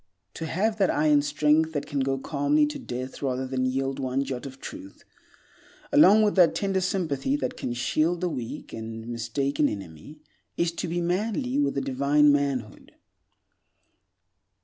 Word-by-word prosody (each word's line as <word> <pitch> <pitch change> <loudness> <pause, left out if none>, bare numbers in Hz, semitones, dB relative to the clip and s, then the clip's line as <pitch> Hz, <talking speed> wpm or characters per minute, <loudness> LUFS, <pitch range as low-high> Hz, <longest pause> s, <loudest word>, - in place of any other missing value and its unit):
To 165 - -5
have 215 +6 0
that 195 - +3
iron 150 -1 +3
strength 150 +2 +2
that 145 - -2
can 145 - -3
go 135 0 0
calmly 150 - +1
to 295 0 -5
death 130 - -6
rather 130 -1 -1
than 130 0 -1
yield 135 +1 -2
one 130 0 -1
jot 130 0 -5
of 135 0 -11
truth, 295 - -10 0.9
along 220 -8 +7
with 210 - +2
that 175 -3 +5
tender 195 -1 0
sympathy 180 - -1
that 295 - -3
can - - -4
shield 155 +8 0
the 180 - +1
weak 120 -7 -6
and 110 0 -7
mistaken 135 +5 -1
enemy, 95 - -9 0.4
is 170 0 +1
to 170 - -4
be 175 +1 -2
manly 225 +10 -1
with 285 - 0
a - - +1
divine 140 +3 +3
manhood. 140 -6 -2
145 Hz, 160 wpm, -26 LUFS, 130-180 Hz, 0.9 s, along